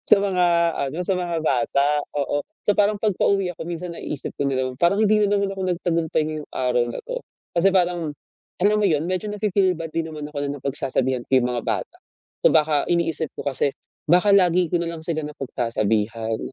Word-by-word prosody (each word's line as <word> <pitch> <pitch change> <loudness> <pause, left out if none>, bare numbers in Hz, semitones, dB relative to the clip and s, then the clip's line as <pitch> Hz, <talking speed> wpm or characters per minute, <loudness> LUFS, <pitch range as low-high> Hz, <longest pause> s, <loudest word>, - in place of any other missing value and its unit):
sa - - +8
mga 185 -3 +2 0.4
ano, 155 - -6
sa 195 - +2
mga 175 -2 -2
bata, 140 +1 +2 0.3
oo. 145 +1 0 0.2
So, 205 - +5
parang 205 +1 +3
'pag 210 -3 +2
pauwi 195 -2 +2
ako - - -7
minsan, 175 0 -5
naiisip 150 -3 -5
ko 140 - 0
din 135 -1 -1
naman, 130 -1 -1
"Parang 175 +4 +3
hindi 215 0 +4
na 205 0 +2
naman 200 0 0
ako 195 - -7
nagtagumpay 170 -3 0
ngayong 155 -1 -6
araw 125 -1 +1
na - - -5
'to", - - -5 0.3
kasi 175 +3 +4
parang, 175 -4 +1 0.5
alam 210 +1 +4
mo 210 - +3
'yon, 155 -4 +1
medyo 185 +3 -2
nafi-feel 200 -3 +1
bad 165 -1 -5
din 165 -1 -1
naman 150 -1 -6
ako 150 - -6
na 140 0 -4
napagsasabihan 130 -2 -1
ko - - -64
'yong 125 - +1
mga 120 -2 -2
bata. - - -2 0.5
So, - - +7
baka, 150 -2 +3
iniisip 165 -3 0
ko - - -6
kasi, 140 0 +1 0.4
baka 180 +5 +4
lagi 180 -2 +4
ko 175 - +3
na 170 - -2
lang 160 - -9
sila 160 -1 -2
napagsasabihan, 115 -5 -1
165 Hz, 205 wpm, -23 LUFS, 140-185 Hz, 0.5 s, sa